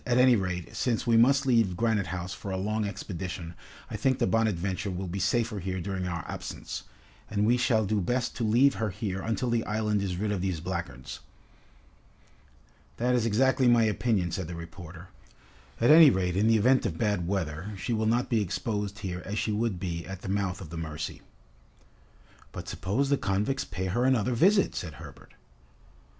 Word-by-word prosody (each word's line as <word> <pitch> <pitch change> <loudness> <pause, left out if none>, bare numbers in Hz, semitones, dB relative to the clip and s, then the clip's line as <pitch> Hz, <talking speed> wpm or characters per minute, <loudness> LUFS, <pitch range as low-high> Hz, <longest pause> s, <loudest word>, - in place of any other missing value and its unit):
"At 120 -1 +1
any 125 -1 +6
rate, 90 -4 -3
since 120 -1 0
we 115 -2 +3
must 135 +5 +5
leave 115 -8 +2
Granite 110 -3 +1
House 90 +1 -4
for 100 - -7
a 95 - -2
long 105 +3 -1
expedition, 90 -4 -5 0.3
I - - -6
think 130 +5 +1
the - - +1
'Bonadventure' 100 -3 0
will 95 +1 -4
be 95 +2 -4
safer 110 +2 0
here 95 0 -3
during 95 0 -3
our 85 -1 -4
absence, - - -6 0.4
and 105 -1 +1
we 120 +3 +4
shall 120 -3 +2
do 105 +1 0
best 125 +6 -1
to 120 - -2
leave 120 +6 +4
her 110 - +1
here 95 0 -4
until 115 +3 -1
the 115 -1 +1
island 105 -1 0
is 95 -3 -2
rid 105 +2 -1
of 100 -3 -1
these 95 -4 -1
blackguards." 85 -8 -5 1.8
"That 125 +2 +1
is 120 -2 +2
exactly 130 +3 +3
my 120 -1 +5
opinion," 105 -4 +1
said 95 -2 -3
the 85 - -6
reporter. 85 +1 -10 0.7
"At 120 +5 +5
any 160 -1 +10
rate 90 -4 0
in 105 +3 +3
the 115 0 +5
event 130 +5 +4
of - - -5
bad 105 -6 0
weather, 90 0 -2
she 115 - -2
will 110 -1 0
not 120 +2 +2
be 115 -3 +1
exposed 105 +1 -3
here 90 -1 -4
as 105 +2 -4
she 110 - 0
would 105 -3 -1
be 85 -3 -3
at 95 -1 -8
the - - -5
mouth 95 -1 -1
of 80 -4 -9
the 85 - -6
Mercy." 80 -1 -5 1.3
"But 85 - -8
suppose 100 +10 -1
the 140 - +3
convicts 105 +8 0
pay 90 +2 -4
her 120 +7 0
another 125 -2 +2
visit," 195 - +4
said 80 -3 -5
Herbert. - - -13
100 Hz, 190 wpm, -28 LUFS, 90-115 Hz, 1.8 s, any